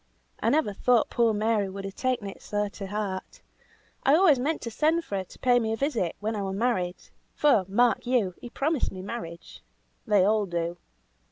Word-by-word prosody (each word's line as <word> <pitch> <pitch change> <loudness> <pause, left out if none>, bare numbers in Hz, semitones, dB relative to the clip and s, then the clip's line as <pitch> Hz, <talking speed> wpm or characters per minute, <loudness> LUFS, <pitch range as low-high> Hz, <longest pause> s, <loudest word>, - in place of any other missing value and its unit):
I - - +1
never 295 -9 +2
thought 240 +3 +2
poor 235 -2 +3
Mary 215 -1 +1
would 195 +1 -7
have 195 - -6
taken 255 -3 -1
it 195 - -9
so 205 0 -1
to 200 -1 -7
heart! 200 -2 -5 0.6
I 275 - +5
always 320 -6 +5
meant 300 +5 -1
to 230 - -4
send 320 +7 +1
for 200 - -4
her 190 - -2
to - - -16
pay 245 -1 +3
me 220 -1 -1
a - - -2
visit 235 - -1
when 220 +2 -2
I 205 - -2
was 195 -1 -3
married; 195 -6 0 0.4
for, 235 -10 +4
mark 240 +5 +2
you! 235 -8 +1
he 245 - -8
promised 295 +3 -1
me 185 -1 -8
marriage. 170 -6 -7 0.5
They 205 -3 +4
all 210 0 +2
do. 170 0 -2
215 Hz, 200 wpm, -27 LUFS, 195-250 Hz, 0.6 s, I